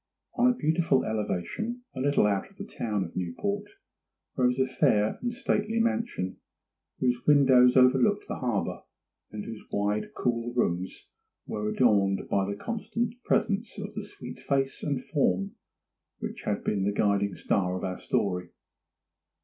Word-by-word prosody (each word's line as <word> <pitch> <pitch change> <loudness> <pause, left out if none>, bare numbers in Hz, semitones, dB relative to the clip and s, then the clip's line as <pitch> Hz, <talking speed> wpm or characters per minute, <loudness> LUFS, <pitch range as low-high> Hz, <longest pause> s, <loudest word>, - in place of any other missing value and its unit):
On 250 0 +4
a - - -2
beautiful 160 - +2
elevation, 110 - -3
a 130 - -6
little 140 -3 +3
out 100 - 0
of 195 - -22
the 200 - -6
town 105 - -2
of 85 - -9
Newport, 200 - -2 0.7
rose 125 -1 +2
a 130 - +3
fair 130 -5 +2
and 240 - -1
stately 230 -3 0
mansion, 230 - -1 0.6
whose 125 -1 0
windows 130 -4 +6
overlooked 130 +11 +4
the - - -4
harbour, 120 -6 -1 0.5
and 105 -1 -6
whose 110 -2 -7
wide 105 +1 -1
cool 120 0 -1
rooms 95 -6 -1 0.4
were 105 0 -3
adorned 100 -5 +2
by 100 -1 +1
the 100 - -2
constant 225 - -2
presence 215 +1 0
of 205 +1 -6
the 210 0 -4
sweet 125 -11 -9
face 135 -1 0
and 140 -4 -2
form 95 - +1 0.7
which - - -6
has 105 -1 -1
been 100 -2 0
the 100 - +1
guiding 100 -1 +1
star 90 -2 0
of - - -7
our 95 -1 -3
story. 90 -3 -1
125 Hz, 150 wpm, -28 LUFS, -, 0.7 s, windows